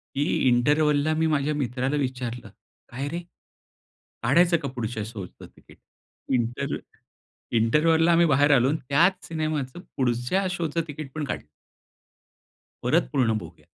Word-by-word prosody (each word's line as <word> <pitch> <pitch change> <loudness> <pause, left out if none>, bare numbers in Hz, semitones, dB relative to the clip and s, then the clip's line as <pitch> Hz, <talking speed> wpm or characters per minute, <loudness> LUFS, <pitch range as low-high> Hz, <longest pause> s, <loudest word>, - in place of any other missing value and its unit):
की 140 - +1 0.2
इंटरव्हलला 145 +4 +3
मी 160 +1 +1
माझ्या 150 -1 +1
मित्राला 130 0 -1
विचारलं, 125 -4 -3 0.4
काय 135 +4 -4
रे? 170 +4 -4 1.0
काढायचं 170 +7 +4
का 145 - -5
पुढच्या 110 -2 -3
शोचं 105 -5 -9
तिकीट - - -19 0.6
इंटर 120 +3 -1 0.8
इंटरव्हलला 160 +9 +3
आम्ही 170 0 +5
बाहेर 145 0 +4
आलो 125 +1 +3
आणि 155 - 0
त्याच 175 +6 +3
सिनेमाचं 155 -3 -3 0.2
पुढच्या 125 +9 0
शोचं 170 -2 -1
तिकीट 150 -2 -7
पण 155 - -2
काढलं. 135 - -4 1.4
परत 155 +8 +2
पूर्ण 130 -6 +2
बघूया. 85 -4 -12
140 Hz, 125 wpm, -25 LUFS, 125-155 Hz, 1.4 s, आम्ही